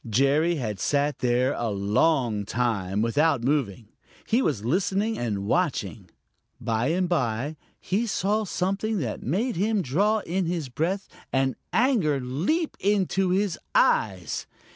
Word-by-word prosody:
Jerry 140 +9 +3
had 110 - -3
sat 145 +5 0
there 125 +2 +2
a 120 -1 -2
long 105 +3 +1
time 105 -3 -1
without 140 +2 +2
moving. 120 -6 -1 0.4
He 235 +4 +2
was 115 - -1
listening 195 - +1
and 105 -5 -2
watching. 110 - -1 0.5
By 115 +1 0
and 180 +3 +1
by 140 -3 -1 0.2
he 215 +5 -1
saw 210 +2 0
something 195 +4 -1
that 125 - -3
made 195 - -1
him 205 +1 +1
draw 205 +11 +1
in 180 0 -1
his 165 -6 -2
breath 175 +10 -2 0.2
and 135 -1 +1 0.2
anger 220 - +2
leap 170 - -1
into 195 -1 +1
his 190 -1 0 0.2
eyes. 95 -6 +1
150 Hz, 135 wpm, -26 LUFS, 120-190 Hz, 0.5 s, Jerry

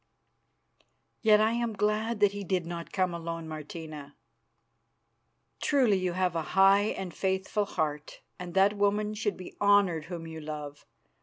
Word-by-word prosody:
"Yet 215 -2 +6
I 215 +1 +3
am 235 -1 -1
glad 210 +2 0
that 205 -1 +5
he 205 0 -6
did 180 -2 -1
not 170 0 -6
come 185 -2 0
alone, 165 -1 -5
Martina." 155 -2 -8 1.5
"Truly 260 -8 +3
you 185 -1 -1
have 180 -1 0
a 165 - 0 0.2
high 195 +1 +6
and 185 -3 -5
faithful 190 +2 -1
heart, 150 -5 -3 0.2
and 180 0 -7
that 195 +2 +5
woman 205 +1 +1
should 210 -1 -2
be 185 - -10
honoured 200 -6 +4
whom 170 -1 -6
you 160 -1 -8
love. 150 -1 -7
190 Hz, 150 wpm, -29 LUFS, 165-205 Hz, 1.5 s, Yet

